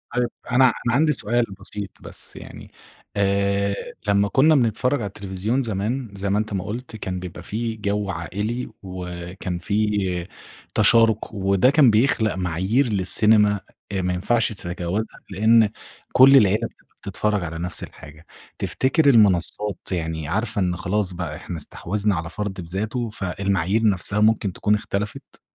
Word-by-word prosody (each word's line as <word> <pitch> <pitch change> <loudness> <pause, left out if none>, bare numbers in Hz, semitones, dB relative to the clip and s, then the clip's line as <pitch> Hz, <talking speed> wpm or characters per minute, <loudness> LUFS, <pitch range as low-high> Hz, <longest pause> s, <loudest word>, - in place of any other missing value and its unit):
طيب 125 -1 +1 0.2
أنا 130 +1 +5
أنا 120 -1 +1
عندي 155 +2 +3
سؤال 120 -1 +1 0.2
بسيط 100 0 -5
بس - - -10
يعني، - - -11 0.4
آآ، 100 0 +1 0.3
لمّا 100 0 +3
كنا 150 +8 +4
بنتفرج 125 +2 +1
على 105 - -2
التلفزيون 100 +5 -2
زمان- 115 +3 -2
زي 100 0 -3
ما 100 +2 +2
أنت 110 -1 -3
ما 95 -2 -2
قُلت- 115 +3 -6
كان 95 -4 -4
بيبقى 90 -1 -8
في 115 +4 -3
جو 105 -1 -2
عائلي 105 +8 -3
وكان 90 -1 -6
في 100 -2 -1 0.5
تشارك، 110 +1 +4
وده 100 +3 +3
كان 140 -4 +5
بيخلق 110 -2 +2
معايير 95 +9 0
للسينما 105 +1 +3 0.3
إ 95 -1 -1
ما 90 0 -1
ينفعش 110 +5 +1
تتجاوزها 90 +3 -4
لإن 110 +3 +4 0.4
كُلّ 135 +2 +8
العيلة 110 0 +3
بتبقى - - -29
بتتفرج 105 -3 -1
على 80 -1 -5
نَفْس 90 +1 -3
الحاجة، 75 +3 -12 0.3
تفتكر 145 +3 +2
المنصات 105 -3 +3
يعني 80 -3 -3
عارفة 105 +4 -1
إن 90 -1 0
خلاص 95 +2 -1
بقى 85 -4 -5
إحنا 85 +2 -7
استحوذنا 100 +6 -1
على 80 -1 -4
فرد 100 -1 -4
بذاته 110 +8 -3
فالمعايير 100 0 -1
نَفسها 100 +2 -1
ممكن 105 -3 +2
تكون 105 +3 +1
اختلفت؟ 105 0 -5
100 Hz, 145 wpm, -22 LUFS, 95-110 Hz, 0.5 s, كُلّ